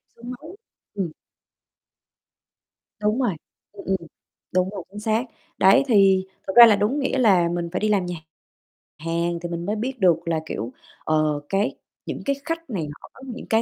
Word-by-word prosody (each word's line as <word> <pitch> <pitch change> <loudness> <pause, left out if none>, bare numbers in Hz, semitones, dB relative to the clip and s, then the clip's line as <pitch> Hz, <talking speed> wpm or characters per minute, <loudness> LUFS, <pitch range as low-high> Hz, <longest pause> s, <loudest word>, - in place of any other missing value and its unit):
xương 240 +2 -9
máu. 310 +9 -10 0.4
Ừm. 190 -6 -3 1.9
Đúng 215 +5 +1
rồi, 200 -10 0 0.4
ừm, 200 -1 -11
ừm. 190 0 +2 0.6
Đúng 185 +1 +2
rồi, 195 -4 -6
chính 205 +1 -9
xác. 220 +3 +1 0.3
Đấy, 195 +8 +6
thì 195 -4 +5 0.2
thực 190 - -3
ra 240 0 +12
là, 215 -3 +6
đúng 230 +9 0
nghĩa 270 0 0
là 190 -8 +4
mình 170 -1 -2
phải 185 - -1
đi 215 - 0
làm 195 -4 +2
nhà 175 0 -4 0.8
hàng 170 +2 -1
thì 175 - -4
mình 170 0 -4
mới 210 +2 -1
biết 250 +3 -4
được 180 -4 +5
là, 165 -1 0
kiểu, 120 -4 -4 0.3
ờ, 155 -1 +1
cái 200 +3 0 0.3
những - - -5
cái 280 0 +1
khách 330 -2 -4
này 170 -9 -3
họ - - -13
có - - -16
những 245 0 -7
cái 225 0 +4
195 Hz, 185 wpm, -23 LUFS, 175-230 Hz, 1.9 s, ra